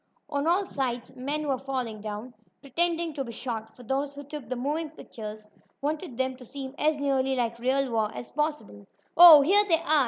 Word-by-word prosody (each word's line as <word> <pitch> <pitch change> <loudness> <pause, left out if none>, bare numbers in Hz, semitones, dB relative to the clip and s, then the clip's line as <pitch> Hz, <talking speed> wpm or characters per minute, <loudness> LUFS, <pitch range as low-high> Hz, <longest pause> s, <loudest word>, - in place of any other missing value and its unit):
On 285 +1 0
all 365 +4 +3
sides 250 -6 -3
men 295 +4 -3
were 270 -2 0
falling 255 -5 -4
down, 215 +4 -6 0.3
pretending 335 +3 -1
to 280 -2 -3
be 235 - -7
shot, 225 -2 -5
for 250 - -13
those 275 +3 -2
who 285 - -8
took 285 -4 -8
the 255 - -1
moving 300 +6 -2
pictures 215 -8 -9 0.3
wanted 300 -2 -3
them 260 0 -1
to 255 - -12
seem 265 +2 -7
as 305 0 +2
nearly 270 -2 +1
like 235 -2 -1
real 260 +1 +1
war 220 -2 +1
as - - -7
possible. 295 - -3 0.3
"Oh, 325 -4 +11
here 395 +8 +5
they 330 - +5
are!" 310 -2 +3
270 Hz, 195 wpm, -27 LUFS, 240-300 Hz, 0.3 s, Oh